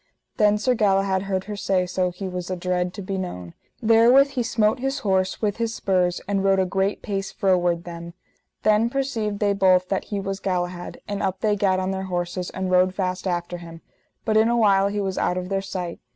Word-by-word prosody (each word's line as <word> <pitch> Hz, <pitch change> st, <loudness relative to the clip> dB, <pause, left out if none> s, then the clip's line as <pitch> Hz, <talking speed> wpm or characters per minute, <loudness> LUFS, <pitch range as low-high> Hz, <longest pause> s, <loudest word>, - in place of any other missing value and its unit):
Then 210 Hz, 0 st, +4 dB
Sir 250 Hz, +4 st, +1 dB
Galahad 195 Hz, -3 st, +2 dB
heard 190 Hz, -1 st, 0 dB
her 210 Hz, +1 st, -6 dB
say 190 Hz, -2 st, 0 dB
so 180 Hz, 0 st, 0 dB
he 180 Hz, +2 st, -6 dB
was 180 Hz, -1 st, -5 dB
adread 180 Hz, 0 st, -1 dB
to 200 Hz, -, -6 dB
be 190 Hz, 0 st, -3 dB
known: 90 Hz, -, -6 dB, 0.3 s
therewith 235 Hz, +5 st, +6 dB
he 265 Hz, -3 st, -1 dB
smote 225 Hz, -1 st, +1 dB
his 270 Hz, +2 st, -1 dB
horse 190 Hz, +1 st, 0 dB
with 205 Hz, -1 st, 0 dB
his 230 Hz, -1 st, -2 dB
spurs 180 Hz, -2 st, +1 dB
and 195 Hz, -1 st, 0 dB
rode 195 Hz, 0 st, +3 dB
a 190 Hz, -, +2 dB
great 195 Hz, +2 st, -1 dB
pace 195 Hz, -1 st, -3 dB
froward 175 Hz, -3 st, +1 dB
them. 170 Hz, 0 st, -8 dB, 0.5 s
Then 215 Hz, +2 st, +3 dB
perceived 235 Hz, -6 st, -2 dB
they 205 Hz, -1 st, +1 dB
both 185 Hz, -2 st, +3 dB
that 195 Hz, -, -1 dB
he 205 Hz, -, -3 dB
was 195 Hz, 0 st, -4 dB
Galahad; 180 Hz, -2 st, -3 dB
and 205 Hz, -1 st, -3 dB
up 190 Hz, 0 st, -2 dB
they 210 Hz, -2 st, +2 dB
gat 195 Hz, -2 st, +1 dB
on 185 Hz, 0 st, -1 dB
their 190 Hz, 0 st, -3 dB
horses, 175 Hz, 0 st, -3 dB
and 185 Hz, 0 st, -3 dB
rode 185 Hz, 0 st, +3 dB
fast 185 Hz, -1 st, -2 dB
after 175 Hz, 0 st, -2 dB
him, 165 Hz, -1 st, -11 dB, 0.4 s
but 215 Hz, -1 st, +2 dB
in 220 Hz, +1 st, +4 dB
a 240 Hz, -, +2 dB
while 200 Hz, -3 st, +4 dB
he 205 Hz, +1 st, -2 dB
was 190 Hz, -1 st, -2 dB
out 180 Hz, -, 0 dB
of 180 Hz, 0 st, -4 dB
their 195 Hz, -1 st, 0 dB
sight. 185 Hz, -3 st, -5 dB
190 Hz, 215 wpm, -23 LUFS, 180-210 Hz, 0.5 s, therewith